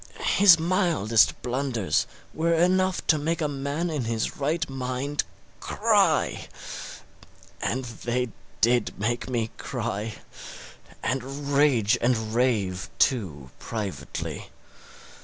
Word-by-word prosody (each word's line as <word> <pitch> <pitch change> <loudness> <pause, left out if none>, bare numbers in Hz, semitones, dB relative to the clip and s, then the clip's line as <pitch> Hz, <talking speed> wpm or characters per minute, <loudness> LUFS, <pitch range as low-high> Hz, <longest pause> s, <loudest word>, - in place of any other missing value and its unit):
His 195 -4 +8
mildest 165 - +2
blunders 125 -5 0 0.3
were 165 +1 +1
enough 185 +2 +2
to 155 - +3
make 165 +3 -1
a 155 - +1
man 145 +4 -2
in 145 -6 -2
his 115 -1 -1
right 160 +3 0
mind 135 +2 -2 0.4
cry; - - +2 1.1
and 130 +1 -1
they 120 +1 -2 0.3
did 120 +1 +2
make 120 +4 -1
me 115 -3 -1
cry 105 +3 -3 0.9
and 135 +3 -3
rage 125 -6 +4
and 110 -3 +1
rave 105 -6 +1
too, 75 - 0
privately. 105 -5 -5
130 Hz, 100 wpm, -26 LUFS, 115-150 Hz, 1.1 s, His